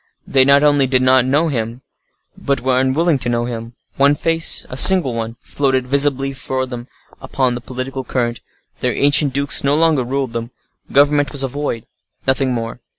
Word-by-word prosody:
They 135 -1 +3
not 140 +1 +4
only 145 -2 +3
did 130 0 +1
not 130 -1 +4
know 145 +5 +1
him, 115 -2 -4 0.5
but 140 0 -2
were 130 0 +1
unwilling 140 +4 +1
to 120 - -2
know 120 0 -1
him. 115 0 -7 0.2
One 140 +1 +4
face—a 165 -4 -1
single 170 -2 +5
one—floated 125 +3 -2
visibly 135 0 +1
for 130 0 -3
them 125 -1 -8 0.3
upon 130 -2 -1
the 120 - -6
political 130 +2 -6
current. 120 -2 -2 0.4
Their - - -1
ancient 145 0 +2
dukes 140 +1 +2
no 140 +1 +2
longer 160 -4 +2
ruled 130 -1 -3
them; 115 0 -5 0.4
government 145 0 +3
was 140 -2 0
a - - 0
void—nothing 130 0 -4
more. 115 0 -5
130 Hz, 165 wpm, -17 LUFS, 125-140 Hz, 0.5 s, single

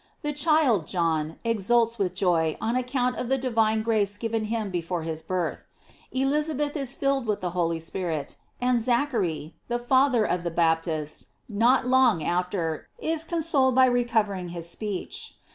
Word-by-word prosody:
The 295 0 -1
child, 290 - +3
John, 160 -3 -1
exults 230 +1 +1
with 185 -2 0
joy 170 -4 +1
on 230 +2 -1
account 250 0 0
of 250 - -3
the 270 - +2
divine 225 -4 +1
grace 210 -3 +1
given 225 0 -2
him 215 -2 -2
before 175 -1 -2
his 160 -1 -4
birth;* 175 +1 -3 0.4
Elizabeth 290 +2 0
is 275 -3 -3
filled 275 -3 0
with 210 -1 0
the 180 -1 -2
Holy 170 -2 0
Spirit, 165 -2 -4 0.2
and 245 -1 +2
Zachary, 225 - 0
the 240 - 0
Fa 260 +3 +3
ther 230 -4 +2
of 180 - 0
the 170 - -1
Baptist, 160 -2 0 0.2
not 235 +5 +3
long 250 -9 +4
af 180 +2 0
t 200 - -3
er, 165 -3 -3
is 320 0 -1
consoled 310 -6 +1
by 260 0 +7
recovering 220 -7 +1
his 170 -1 -5
speech. 205 +2 -5
220 Hz, 165 wpm, -26 LUFS, 175-255 Hz, 0.4 s, by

